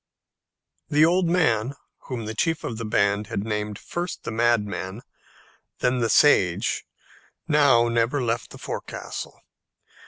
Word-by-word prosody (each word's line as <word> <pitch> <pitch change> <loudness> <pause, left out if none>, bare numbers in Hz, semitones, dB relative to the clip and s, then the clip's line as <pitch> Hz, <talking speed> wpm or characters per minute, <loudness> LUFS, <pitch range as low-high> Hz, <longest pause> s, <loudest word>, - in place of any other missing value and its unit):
The 150 +1 +5
old 175 +2 +2
man 135 -8 +1 0.3
whom 120 -4 -4
the 110 - -4
chief 160 +8 0
of 115 - -4
the 115 - -4
band 100 0 +1
had 105 -3 -3
named 105 -1 -3
first 175 0 -5
the - - -4
Madman, 110 -3 0 0.7
then 125 0 +1
the 115 -1 +1
Sage, 95 -13 +3 0.6
now 140 -6 +4
never 115 +4 +1
left 120 -2 -2
the - - -11
forecastle. - - -6
115 Hz, 130 wpm, -24 LUFS, 105-145 Hz, 0.7 s, The